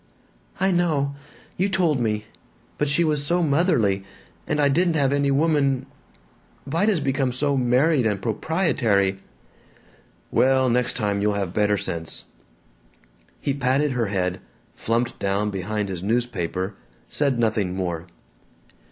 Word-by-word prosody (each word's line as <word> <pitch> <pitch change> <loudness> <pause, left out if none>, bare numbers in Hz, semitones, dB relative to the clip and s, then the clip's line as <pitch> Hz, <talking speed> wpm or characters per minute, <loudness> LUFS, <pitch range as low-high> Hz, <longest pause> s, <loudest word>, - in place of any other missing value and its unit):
"I 190 +1 +2
know. 155 -6 +1 0.4
You 190 +3 +1
told 175 -8 +1
me. 105 -2 -1 0.5
But 150 - +1
she 145 +5 +2
was 150 -3 +1
so 175 +4 +1
motherly. 140 - +2 0.4
And - - 0
I 145 - +4
didn't 170 +4 +2
have 140 -2 +2
any 140 0 +1
woman 140 -2 +2 0.8
Vida 170 +9 +1
's - - 0
become 135 -2 0
so 140 +3 0
married 130 +1 +3
and 105 -2 -1
proprietary." 110 - +1 1.1
"Well, 130 -1 +3
next 125 +1 +1
time 100 -4 -1
you'll 105 0 +2
have 95 -3 -2
better 105 0 +2
sense." 85 -3 -4 1.2
He 140 - -1
patted 135 +2 +1
her 120 -3 0
head, 90 -2 -1 0.3
flumped 115 +2 -1
down 100 +2 0
behind 100 +2 -2
his 95 -3 -5
newspaper, 100 -4 -1 0.3
said 140 -4 0
nothing 110 -5 0
more. 85 -2 -3
125 Hz, 135 wpm, -23 LUFS, 105-145 Hz, 1.2 s, I